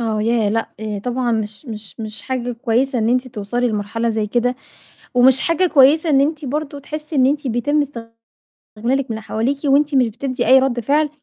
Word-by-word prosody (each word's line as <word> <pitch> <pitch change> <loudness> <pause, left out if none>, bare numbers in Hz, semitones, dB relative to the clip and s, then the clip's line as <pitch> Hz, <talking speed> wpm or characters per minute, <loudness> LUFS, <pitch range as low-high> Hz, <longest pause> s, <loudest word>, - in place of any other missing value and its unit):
آه. 220 -2 -1
يا 225 -2 +1
لأ، 225 +1 -1 0.4
طبعًا 245 -1 -1
مش 215 +3 -4
مش 215 -1 -8
مش 215 -1 -6
حاجة 250 -2 -3
كويسة 245 +2 0
إن 220 0 +1
أنتِ 255 +1 +1
توصلي 240 +2 -2
لمرحلة 220 +2 -2
زي 220 -1 -1
كده، 245 +3 0 0.6
ومش 255 +1 +5
حاجة 335 +2 +2
كويسة 310 +1 +4
إن 275 -2 +4
أنتِ 295 +1 0
برضه 290 +2 -3
تحسّي 305 +2 -6
إن 260 -1 +5
أنتِ 290 +1 0
بيتم 275 +5 +1 0.7
استغلالِك 250 +4 -3
من 220 - -3
حواليكِ 225 +5 -2
وأنتِ 285 +1 +3
مش 255 -3 +4
بتدّي 255 +4 -3
أي 265 +1 +7
رَد 260 -2 0
فعل. 295 +6 +1
250 Hz, 180 wpm, -19 LUFS, 225-280 Hz, 0.7 s, أي